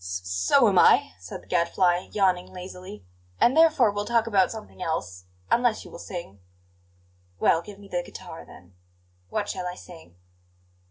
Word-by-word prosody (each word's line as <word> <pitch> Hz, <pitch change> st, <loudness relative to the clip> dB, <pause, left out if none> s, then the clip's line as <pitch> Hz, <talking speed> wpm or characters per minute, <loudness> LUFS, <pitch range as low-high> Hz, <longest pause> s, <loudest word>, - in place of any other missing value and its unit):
"S 90 Hz, 0 st, -4 dB
so 90 Hz, 0 st, +3 dB
am -, -, +4 dB
I," -, -, +5 dB
said 95 Hz, -, -9 dB
the -, -, -22 dB
Gadfly, 175 Hz, +1 st, +1 dB
yawning 185 Hz, -3 st, +1 dB
lazily; 180 Hz, -, -10 dB, 0.3 s
"and 245 Hz, -, +4 dB
therefore 315 Hz, -9 st, +5 dB
we'll 205 Hz, 0 st, -3 dB
talk 230 Hz, -1 st, +2 dB
about 200 Hz, -5 st, +3 dB
something 220 Hz, -4 st, -10 dB
else 95 Hz, -, -4 dB, 0.3 s
unless 240 Hz, -2 st, +2 dB
you -, -, -12 dB
will -, -, -10 dB
sing." 170 Hz, -, -8 dB, 1.0 s
"Well, 165 Hz, -, +3 dB
give 200 Hz, +3 st, -12 dB
me 200 Hz, 0 st, -14 dB
the 175 Hz, -2 st, -2 dB
guitar, -, -, -10 dB
then. 90 Hz, +2 st, -16 dB, 0.6 s
What 205 Hz, -1 st, -2 dB
shall 185 Hz, -3 st, -4 dB
I 180 Hz, -, -5 dB
sing?" 165 Hz, -, -14 dB
180 Hz, 165 wpm, -25 LUFS, 160-205 Hz, 1.0 s, I